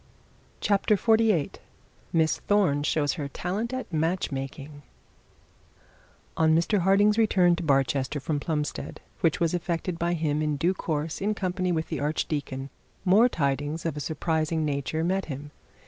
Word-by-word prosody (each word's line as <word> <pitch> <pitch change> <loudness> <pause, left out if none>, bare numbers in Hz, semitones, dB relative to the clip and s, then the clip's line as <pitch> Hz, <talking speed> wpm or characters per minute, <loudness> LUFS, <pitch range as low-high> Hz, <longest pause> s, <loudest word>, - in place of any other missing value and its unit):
CHAPTER 205 +1 +2
XLVIII 220 -8 +3 0.6
MISS 160 -1 +2
THORNE 190 -9 +3
SHOWS 145 -1 +1
HER 145 -5 -4
TALENT 190 +10 -3
FOR 255 0 -4
MATCH 165 +3 0
MAKING 140 +2 -6 1.5
On 160 0 +4
Mr 170 +5 +2
Harding's 205 +4 +4
return 185 -5 +4
to - - -4
Barchester 135 -2 +1
from 145 +2 -2
Plumstead, 150 -1 -3 0.2
which 165 -1 +1
was 170 -1 +1
effected 170 0 -2
by 170 +1 +1
him 155 -2 0
in 150 -1 0
due 170 +6 +2
course 155 -2 -3
in 210 +2 0
company 185 -1 -1
with 160 -2 -1
the 160 - -3
archdeacon, 145 -2 -2 0.4
some 215 +7 +6
tidings 145 - -1
of 165 - -1
a - - -4
surprising 160 +1 -1
nature 145 +2 -1
met 190 +3 0
him. 145 0 -7
160 Hz, 145 wpm, -27 LUFS, 145-185 Hz, 1.5 s, some